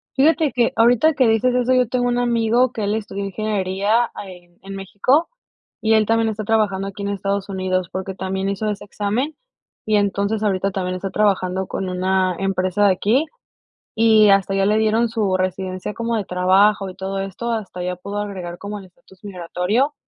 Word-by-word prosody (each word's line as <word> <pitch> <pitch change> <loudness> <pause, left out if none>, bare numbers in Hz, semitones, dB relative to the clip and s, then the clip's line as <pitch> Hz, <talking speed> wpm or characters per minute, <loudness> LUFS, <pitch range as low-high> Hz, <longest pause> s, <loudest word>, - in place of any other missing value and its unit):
Fíjate 305 +2 +3
que 240 -2 +1
ahorita 245 +7 +4
que 265 -4 +3
dices 225 +3 +2
eso, 250 +1 +2
yo 250 -1 +3
tengo 245 +1 0
un 245 0 0
amigo 240 0 +2
que 220 - -4
él 205 +1 0
estudió 200 -2 -4
ingeniería 205 +2 0
ahí 180 -3 -10
en 195 0 -8
México, 205 - +1 0.5
y 220 0 +2
él 220 -1 +4
también 225 0 +2
está 215 0 -4
trabajando 205 -3 0
aquí 200 +1 -7
en 200 - -2
Estados 200 0 -2
Unidos, 185 -2 -1
porque 190 0 -5
también 190 +1 -2
hizo 200 +2 -2
ese 205 -1 -3
examen, 215 +9 -2 0.5
y 215 -1 +2
entonces 200 +1 0
ahorita 195 -2 0
también 185 -1 -3
está 190 +1 -5
trabajando 190 -2 0
con 190 - -4
una 185 0 0
empresa 195 +1 +1
de - - +5
aquí, 225 - +1 0.7
y 220 -2 +5
hasta 195 0 +2
ya 195 0 +2
le 210 +2 +3
dieron 220 +2 +2
su 215 -5 0
residencia 185 +1 -3
como 230 +1 -2
de 205 - -3
trabajo 190 +2 +3
y 185 - -10
todo 195 +1 -4
esto, 195 +5 -4
hasta 210 -5 -4
ya 180 0 -2
pudo 200 +3 -7
agregar 185 -4 -5
como 205 +2 -6
el 195 - -12
estatus 185 +1 -22
migratorio. 200 - -1
200 Hz, 190 wpm, -20 LUFS, 190-225 Hz, 0.7 s, de